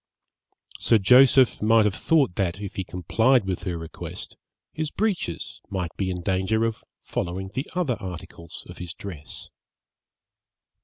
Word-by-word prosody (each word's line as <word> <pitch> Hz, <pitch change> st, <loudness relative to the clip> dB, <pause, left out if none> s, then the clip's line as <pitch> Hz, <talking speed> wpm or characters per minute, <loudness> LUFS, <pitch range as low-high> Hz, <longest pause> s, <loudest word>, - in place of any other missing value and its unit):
Sir 115 Hz, -, +4 dB
Joseph 125 Hz, +4 st, +6 dB
might 110 Hz, 0 st, +5 dB
have 105 Hz, -, +2 dB
thought 140 Hz, -, +2 dB
that, 95 Hz, 0 st, -1 dB
if 100 Hz, -1 st, -6 dB
he 95 Hz, -, -2 dB
complied 110 Hz, -, +2 dB
with 95 Hz, -2 st, -3 dB
her 90 Hz, -3 st, -2 dB
request, 80 Hz, -1 st, -8 dB, 0.4 s
his 155 Hz, 0 st, -2 dB
breeches 190 Hz, -, -2 dB
might 90 Hz, -3 st, -3 dB
be 95 Hz, -2 st, -1 dB
in 90 Hz, -1 st, -4 dB
danger 95 Hz, +4 st, +1 dB
of 115 Hz, -1 st, -3 dB, 0.2 s
following 95 Hz, +2 st, -3 dB
the 130 Hz, +3 st, -3 dB
other 150 Hz, -11 st, 0 dB
articles 85 Hz, -2 st, -8 dB
of -, -, -11 dB
his 90 Hz, 0 st, -6 dB
dress. 85 Hz, -8 st, -7 dB
100 Hz, 145 wpm, -25 LUFS, 90-125 Hz, 0.4 s, Joseph